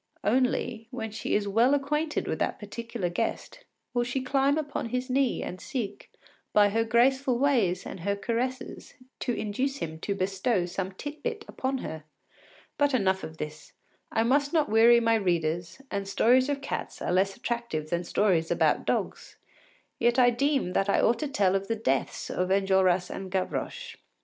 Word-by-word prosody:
Only, 245 Hz, 0 st, 0 dB
when 225 Hz, -3 st, -5 dB
she 220 Hz, -, -2 dB
is 205 Hz, -1 st, 0 dB
well 235 Hz, +7 st, +4 dB
acquainted 300 Hz, +3 st, -1 dB
with -, -, -2 dB
the -, -, 0 dB
particular 230 Hz, -1 st, -4 dB
guest, 225 Hz, -, -3 dB, 0.4 s
she 245 Hz, +2 st, -2 dB
will -, -, -8 dB
climb 275 Hz, +2 st, +2 dB
upon 290 Hz, -6 st, -3 dB
his 250 Hz, +2 st, -2 dB
knee 270 Hz, -1 st, +1 dB
and 180 Hz, -, -6 dB
seek, 215 Hz, -6 st, -5 dB, 0.4 s
by 205 Hz, -1 st, +6 dB
her 225 Hz, +3 st, +1 dB
graceful 250 Hz, +3 st, +3 dB
ways 240 Hz, -10 st, +2 dB
and -, -, -7 dB
her 200 Hz, +4 st, -1 dB
caresses, 240 Hz, +5 st, -3 dB, 0.2 s
to -, -, -1 dB
induce 255 Hz, +6 st, -2 dB
him 160 Hz, -, -5 dB
to 200 Hz, +4 st, -2 dB
bestow 195 Hz, +1 st, 0 dB
some 185 Hz, +2 st, -4 dB
tit 290 Hz, +9 st, -7 dB
bit 450 Hz, -3 st, -4 dB
upon 265 Hz, +1 st, -2 dB
her. 160 Hz, -1 st, -6 dB, 0.8 s
But 285 Hz, -2 st, +3 dB
enough 190 Hz, -4 st, +1 dB
of 160 Hz, 0 st, -7 dB
this; 150 Hz, 0 st, -7 dB, 0.4 s
I 225 Hz, -, +2 dB
must 280 Hz, +4 st, +2 dB
not 310 Hz, -7 st, +2 dB
weary 230 Hz, +2 st, +6 dB
my 230 Hz, -1 st, +2 dB
readers, 175 Hz, -3 st, 0 dB
and 200 Hz, -1 st, -2 dB
stories 250 Hz, +6 st, +3 dB
of 280 Hz, -1 st, -1 dB
cats 280 Hz, -, -5 dB
are -, -, 0 dB
less 195 Hz, +1 st, +2 dB
attractive 235 Hz, -11 st, -3 dB
than 170 Hz, 0 st, 0 dB
stories 175 Hz, -3 st, +1 dB
about -, -, +2 dB
dogs. -, -, -2 dB, 0.6 s
Yet 240 Hz, +1 st, +3 dB
I 245 Hz, -1 st, +6 dB
deem 270 Hz, -6 st, 0 dB
that 195 Hz, +1 st, +1 dB
I -, -, +3 dB
ought 235 Hz, 0 st, +3 dB
to 300 Hz, -, -2 dB
tell 200 Hz, -8 st, +2 dB
of 195 Hz, 0 st, -1 dB
the 225 Hz, -, 0 dB
deaths 135 Hz, -12 st, -1 dB
of 180 Hz, 0 st, -1 dB
Enjolras 190 Hz, -2 st, +2 dB
and 190 Hz, -1 st, -6 dB
Gavroche. 455 Hz, -, -3 dB
225 Hz, 175 wpm, -28 LUFS, 190-260 Hz, 0.8 s, by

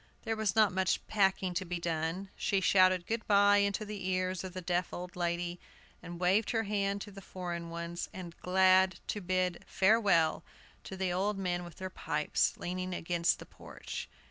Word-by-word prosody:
There 225 Hz, -1 st, -1 dB
was 220 Hz, -3 st, 0 dB
not 215 Hz, -4 st, +4 dB
much 190 Hz, 0 st, 0 dB
packing 190 Hz, -3 st, +1 dB
to 185 Hz, -, -1 dB
be 180 Hz, -1 st, -4 dB
done. 170 Hz, +3 st, -2 dB
She 195 Hz, -, +1 dB
shouted 185 Hz, -2 st, +4 dB
good 225 Hz, +3 st, -3 dB
by 205 Hz, 0 st, +6 dB
into 200 Hz, +1 st, +1 dB
the 205 Hz, -3 st, -5 dB
ears 185 Hz, 0 st, -1 dB
of 185 Hz, -1 st, -7 dB
the -, -, -3 dB
deaf 175 Hz, +1 st, -1 dB
old 180 Hz, 0 st, -7 dB
lady, 175 Hz, 0 st, -2 dB, 0.4 s
and 175 Hz, 0 st, -8 dB
waved 190 Hz, +4 st, +2 dB
her 225 Hz, -1 st, +1 dB
hand 200 Hz, -1 st, -1 dB
to 205 Hz, -, -7 dB
the 195 Hz, 0 st, -10 dB
foreign 175 Hz, -3 st, -5 dB
one, 170 Hz, 0 st, -5 dB, 0.2 s
and 175 Hz, -2 st, -8 dB
glad 185 Hz, 0 st, +4 dB
to 210 Hz, -, -2 dB
bid 185 Hz, -1 st, -1 dB
farewell 190 Hz, -6 st, +3 dB, 0.4 s
to 190 Hz, -, -7 dB
the 185 Hz, -1 st, 0 dB
old 195 Hz, +3 st, 0 dB
men 180 Hz, -2 st, -1 dB
with 175 Hz, -1 st, -10 dB
their 185 Hz, 0 st, -6 dB
pipes, 150 Hz, -3 st, 0 dB
leaning 185 Hz, +1 st, -3 dB
against 170 Hz, 0 st, +1 dB
the -, -, -10 dB
porch. -, -, -8 dB
185 Hz, 185 wpm, -32 LUFS, 175-200 Hz, 0.4 s, by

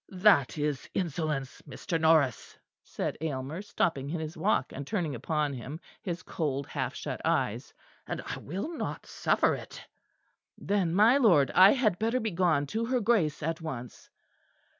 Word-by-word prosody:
"That 185 Hz, -8 st, +3 dB
is 145 Hz, -2 st, -2 dB
insolence, 155 Hz, -6 st, -2 dB
Mr. 165 Hz, +5 st, -3 dB
Norris," 155 Hz, -7 st, +2 dB, 0.3 s
said -, -, -4 dB
Aylmer, 150 Hz, +2 st, -3 dB
stopping 145 Hz, -8 st, -1 dB
in 165 Hz, +2 st, -2 dB
his 155 Hz, +1 st, -5 dB
walk 160 Hz, -4 st, 0 dB
and 140 Hz, 0 st, -6 dB
turning 175 Hz, -9 st, -1 dB
upon 145 Hz, +4 st, -1 dB
him 135 Hz, +5 st, -7 dB, 0.2 s
his 175 Hz, -1 st, -4 dB
cold 140 Hz, -4 st, -2 dB
half -, -, -3 dB
shut -, -, -5 dB
eyes, -, -, 0 dB, 0.4 s
"and -, -, -3 dB
I -, -, -5 dB
will 200 Hz, -, -5 dB
not -, -, -4 dB
suffer -, -, +1 dB
it." -, -, -8 dB, 0.7 s
"Then, 190 Hz, -4 st, 0 dB
my 225 Hz, +7 st, +6 dB
lord, 175 Hz, -, +4 dB
I 190 Hz, +2 st, +8 dB
had 215 Hz, -9 st, +1 dB
better 230 Hz, +3 st, +1 dB
begone 175 Hz, -, +1 dB
to 225 Hz, +1 st, 0 dB
her 250 Hz, +1 st, +1 dB
Grace 195 Hz, -10 st, +1 dB
at 165 Hz, +1 st, -2 dB
once." 125 Hz, -7 st, -7 dB
165 Hz, 155 wpm, -29 LUFS, 145-200 Hz, 0.7 s, I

